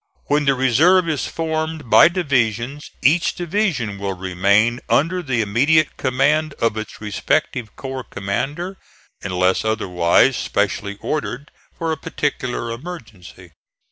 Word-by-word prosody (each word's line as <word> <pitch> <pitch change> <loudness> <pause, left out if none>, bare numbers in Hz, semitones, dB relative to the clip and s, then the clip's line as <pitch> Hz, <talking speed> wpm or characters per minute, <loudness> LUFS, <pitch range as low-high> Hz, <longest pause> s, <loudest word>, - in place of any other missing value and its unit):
When 145 0 +1
the 135 -1 +3
reserve 160 +9 +4
is 155 -3 -1
formed 160 -2 -3
by - - +8
divisions, 140 - -1
each 160 +6 +3
division 165 - -1
will 100 -1 -3
remain 100 +6 +2
under 180 +5 +2
the 130 -8 -1
immediate 140 +9 +2
command 145 +4 +1
of 115 -2 0
its 110 0 -6
respective 110 +2 -2
corps 130 -2 -6
commander, 145 - -3 0.4
unless 90 -1 +1
otherwise 105 +1 +2
specially 100 0 -1
ordered 145 -1 -4 0.3
for 165 -1 -2
a 160 - -2
particular 130 -5 -3
emergency. 115 - -10
130 Hz, 120 wpm, -20 LUFS, 105-155 Hz, 0.4 s, by